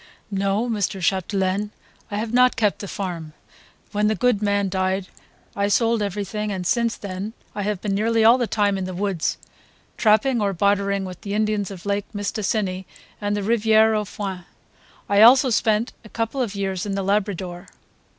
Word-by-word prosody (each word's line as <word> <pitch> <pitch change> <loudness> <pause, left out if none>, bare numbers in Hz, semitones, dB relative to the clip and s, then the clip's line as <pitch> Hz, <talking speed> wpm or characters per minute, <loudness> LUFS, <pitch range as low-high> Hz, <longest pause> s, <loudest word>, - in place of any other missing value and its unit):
"No, 200 +4 0
Mr. 205 -4 -1
Chapdelaine, 190 +2 0 0.4
I 205 - -3
have 220 +2 -3
not 250 0 +5
kept 210 -5 +1
the 200 - -6
farm. 175 -6 -5 0.6
When 210 +1 +1
the 215 - +1
good 245 -4 +2
man 200 -1 +1
died 190 0 -1 0.5
I 200 0 +1
sold 230 +2 +2
everything, 205 +1 -3
and 185 -2 -4
since 235 +3 +1
then 200 +2 -5 0.2
I 205 - -4
have 200 -1 -2
been 205 -2 -1
nearly 225 +2 +2
all 235 +3 +7
the 240 - 0
time 205 -2 +1
in 185 - -3
the 185 -1 -5
woods, 190 -3 -1 0.6
trapping 220 +3 +3
or 200 -1 +1
bartering 200 +1 +1
with 185 -1 -8
the 200 0 -4
Indians 215 -2 0
of 190 -2 -10
Lake 200 0 -1
Mistassini 200 -2 -2 0.3
and 205 0 -1
the 205 - -2
Riviere 220 0 +4
aux 210 -1 0
Foins. 190 -3 -6 0.6
I 200 0 +4
also 255 +3 +7
spent 220 +1 +1
a 215 - -13
couple 230 +5 -2
of 215 -5 -2
years 195 -2 -2
in 195 - -2
the 195 - -1
Labrador." 195 -2 -2
205 Hz, 180 wpm, -23 LUFS, 195-215 Hz, 0.6 s, all